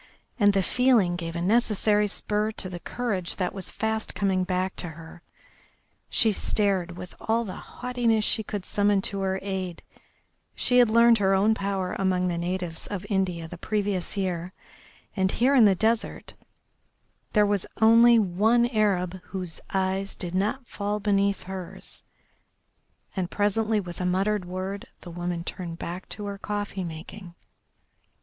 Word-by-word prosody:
And 205 -1 +5
the 195 -1 +2
feeling 235 -7 +3
gave 165 -1 -5
a 170 - -2
necessary 210 0 +3
spur 210 +1 -1
to 185 - -5
the 175 -1 -6
courage 200 -5 -2
that 180 -2 -2
was 195 -3 -5
fast 220 0 -2
coming 190 -2 +1
back 185 0 -1
to 175 - -4
her. 165 +1 -12 0.9
She 225 -4 +3
stared 190 -4 0
with 180 - -8
all 230 +1 0
the 185 - -6
haughtiness 240 -3 -1
she - - +2
could 205 -2 -5
summon 205 -1 +2
to 200 -1 -3
her 190 0 0
aid; 190 -3 -4 0.7
she 250 0 +3
had 240 -2 +6
learned 230 0 +6
her 195 -1 +3
own 205 +3 +4
power 195 -3 -2
among 185 -1 +1
the 170 -1 -2
natives 175 -1 -3
of 200 -1 -5
India 180 -4 0
the 175 +1 -10
previous 205 -2 -1
year, 180 -2 -2 0.6
and 190 -2 +1
here 255 +4 +3
in 250 -5 +7
the 195 -2 +5
desert 220 +4 -1 1.0
there 210 -1 +5
was 205 -2 0
only 230 +2 +7
one 220 +4 +3
Arab 190 -5 0
whose 185 -4 -6
eyes 190 +1 -1
did 175 -2 -5
not 215 +8 0
fall 205 -1 -3
beneath 200 -1 +1
hers, 190 -1 -8 1.1
and 185 -3 -2
presently 215 +2 +1
with 180 -2 -6
a - - -1
muttered 195 +2 +1
word 185 +2 -5
the 175 - -9
woman 175 0 -3
turned 170 -2 -5
back 175 +2 -6
to 210 - -6
her 200 -1 -5
coffee 205 -2 -3
making. 175 +2 -8
195 Hz, 155 wpm, -26 LUFS, 180-215 Hz, 1.1 s, in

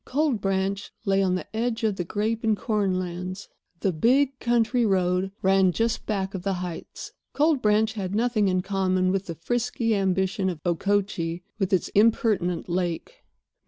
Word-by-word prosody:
Cold 275 -5 0
Branch 195 +1 -1
lay 195 -1 +3
on 185 -1 +2
the 185 - -4
edge 230 0 -1
of 215 -3 +1
the 180 - -2
grape 215 +5 -2
and 220 -2 +2
corn 200 -5 0
lands. 185 +2 -5 0.3
The 195 - +2
big 260 - +2
country 240 0 +2
road 185 -2 +1
ran 190 -1 +4
just 230 +5 -1
back 195 -3 -2
of 190 - -4
the 195 +1 -1
heights. 180 -2 -7 0.2
Cold 300 -2 +2
Branch 215 +1 +2
had 195 -3 -4
nothing 225 -2 +2
in 185 -1 +1
common 185 -2 +1
with 195 0 -1
the 170 - -5
frisky 235 - -1
ambition 190 0 0
of 175 -4 -5
Okochee 175 -1 0 0.2
with 195 -2 0
its 185 -3 +1
impertinent 205 -5 +2
lake. 180 - -3
195 Hz, 165 wpm, -25 LUFS, 185-225 Hz, 0.3 s, ran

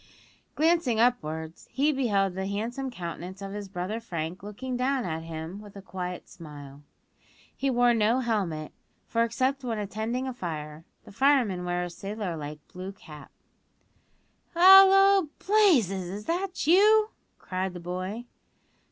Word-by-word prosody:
Glancing 315 -7 +2
upwards, 160 -10 -1
he 285 +3 +1
beheld 205 -9 +1
the 190 +1 -3
handsome 235 +7 -3
countenance 180 -3 -7
of 195 -1 -6
his 205 -1 -6
brother 190 +4 -4
Frank 170 -5 -5
looking 245 +6 -6
down 260 +1 0
at 160 -2 -3
him 165 +4 -7
with 205 -1 -13
a 200 - -8
quiet 180 -2 -6
smile. 145 -4 -11 0.7
He 275 - -1
wore 245 -1 +4
no 230 +3 +2
helmet, 190 -10 -2 0.3
for 230 0 +1
except 260 +4 -1
when 235 -3 -2
attending 220 +5 -3
a 260 - -3
fire 155 -6 -6 0.2
the - - -13
firemen 235 -7 +2
wear 175 0 -1
a 175 - -4
sailor 200 -1 -5
like 150 -1 -8
blue 185 +2 -7
cloth 200 - -21
cap. 150 -3 -12 1.2
"Hallo, 385 0 +7
Blazes! 255 - +3
is 205 +3 -7
that 360 +1 -2
you?" 425 +6 +5 0.3
cried 185 0 -4
the - - -6
boy. 185 +6 -5
205 Hz, 145 wpm, -27 LUFS, 180-260 Hz, 1.2 s, Hallo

